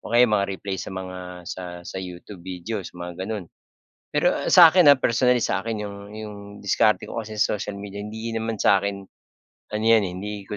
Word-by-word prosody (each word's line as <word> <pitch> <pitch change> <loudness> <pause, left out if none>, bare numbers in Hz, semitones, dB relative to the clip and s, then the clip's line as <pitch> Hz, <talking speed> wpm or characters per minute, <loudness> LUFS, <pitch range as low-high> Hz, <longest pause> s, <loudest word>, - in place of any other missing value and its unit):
O - - -9
kaya 120 +1 +7
yung 110 - 0
mga-replay 100 -2 -1
sa - - -6
mga 95 -1 -6 0.3
sa 90 +2 -6 0.2
sa - - -7
YouTube 90 +1 -9
videos 95 +3 -5
mga 90 0 -7
gano'n. 105 -2 -4 0.6
Pero - - +2 0.2
sa 170 -3 +9
akin 180 -5 +6
ah, 140 - +9
personally 125 0 +2
sa 95 - 0
akin 110 -1 -3
yung 100 0 -6 0.2
yung 105 -1 -7 0.3
diskarte 105 +2 +3
ko 115 - -4
kasi 110 -1 -8
sa 105 - +2
social 100 0 -5
media 100 0 -7
hindi 110 +2 -5
naman 115 0 -2
sa 100 -1 +4
akin, 100 -1 -4 0.7
ano 110 +1 -1
'yan 115 -1 +6
eh, 90 - -5
hindi 105 +2 -5 0.2
ko 105 - -4
105 Hz, 205 wpm, -24 LUFS, 95-115 Hz, 0.7 s, sa